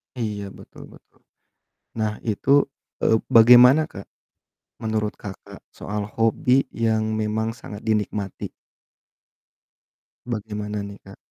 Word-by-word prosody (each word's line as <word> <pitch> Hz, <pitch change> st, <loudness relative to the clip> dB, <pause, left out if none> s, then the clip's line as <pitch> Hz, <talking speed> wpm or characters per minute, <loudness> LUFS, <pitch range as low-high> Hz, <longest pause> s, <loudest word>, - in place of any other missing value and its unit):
Iya, 105 Hz, -4 st, -3 dB, 0.2 s
betul -, -, -13 dB
betul. -, -, -24 dB, 0.8 s
Nah, 110 Hz, -1 st, +1 dB, 0.2 s
itu, 110 Hz, +5 st, -1 dB, 0.5 s
eee, -, -, +3 dB, 0.2 s
bagaimana, 125 Hz, +5 st, +8 dB
Kak, 100 Hz, -, -8 dB, 0.8 s
menurut 110 Hz, -1 st, -2 dB
Kakak 100 Hz, -2 st, -10 dB
soal 105 Hz, 0 st, -5 dB
hobi 125 Hz, +4 st, +2 dB, 0.2 s
yang 110 Hz, -1 st, +2 dB, 0.2 s
memang 110 Hz, +2 st, -2 dB
sangat 105 Hz, -2 st, -9 dB
dinikmati? 105 Hz, -2 st, -2 dB, 1.8 s
Bagaimana 105 Hz, -3 st, -4 dB
nih, 100 Hz, 0 st, -8 dB
Kak? -, -, -12 dB
110 Hz, 100 wpm, -23 LUFS, 105-115 Hz, 1.8 s, bagaimana